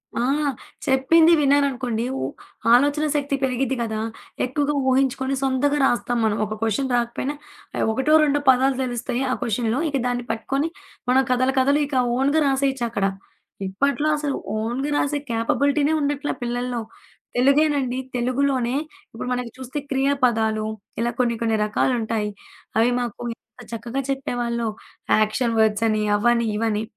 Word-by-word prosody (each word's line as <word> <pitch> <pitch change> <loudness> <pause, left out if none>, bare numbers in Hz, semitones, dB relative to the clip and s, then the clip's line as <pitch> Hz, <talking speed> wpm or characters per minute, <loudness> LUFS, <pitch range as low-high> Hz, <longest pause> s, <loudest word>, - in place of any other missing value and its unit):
ఆ! - - 0 0.6
చెప్పింది 315 +6 +5
విన్నాననుకోండి. 270 -5 +1 0.2
ఉ - - 0 0.5
ఆలోచనా 290 +4 +4
శక్తి 285 -1 0
పెరిగిద్ది 265 0 0
గదా! 220 -2 -2 0.4
ఎక్కువగా 290 +3 0 0.2
ఊహించుకొని 265 0 +1
సొంతగా 275 +2 +1
రాస్తాం 245 -1 +1
మనం. 215 -1 +1
ఒక 215 - -5
క్వశ్చన్ 225 +5 0
రాకపోయినా. 240 +4 -1 0.4
ఆహ్, - - 0
ఒకటో 265 +7 +1
రెండో 290 -1 +2
పదాలు 260 +1 +4
తెలుస్తాయి 245 0 -2
ఆ - - +2
క్వెషన్లో 235 +1 0
ఇక 280 - 0
దాన్ని 245 0 -1
పట్టుకొని 275 +7 -1 0.4
మనం 260 +1 +5
కథల 255 +1 +2
కథలు 280 +3 +3
ఇక 285 - -5 0.2
ఓన్‌గా 285 +4 +2
రాసేయొచ్చు 270 -2 +1
అక్కడ. 200 -4 -1 0.6
ఇప్పట్లో 280 +10 0
అసలు 290 -2 -2 0.2
ఓన్‌గా 240 +6 -2
రాసే 290 0 0
క్యాపబిలిటీనే 285 +6 +1
ఉండట్లా 290 0 -1
పిల్లల్లో. 245 0 -2 0.6
తెలుగేనండి. 275 -1 +3 0.2
తెలుగులోనే 255 0 0 0.4
ఇప్పుడు 225 - -6
మనకి 245 -2 -3
చూస్తే 260 +2 -5
క్రియా 270 +1 +2
పదాలు 220 -2 +1 0.3
ఇలా 235 +1 +1
కొన్ని 240 -2 +2
కొన్ని 225 -1 +1
రకాలుంటాయి. 220 -1 0 0.5
అవి 230 +2 +4
మాకు 240 -1 -4
ఎంత 245 - -19
చక్కగా 235 +4 -3
చెప్పేవాళ్ళో. 240 -3 -2 0.5
యాక్షన్ 230 +2 +1
వర్డ్స్ 220 0 +3
అని. 215 0 +1
అవ్వని 235 +2 +2
ఇవని. 220 -1 0
255 Hz, 135 wpm, -23 LUFS, 235-275 Hz, 0.6 s, చెప్పింది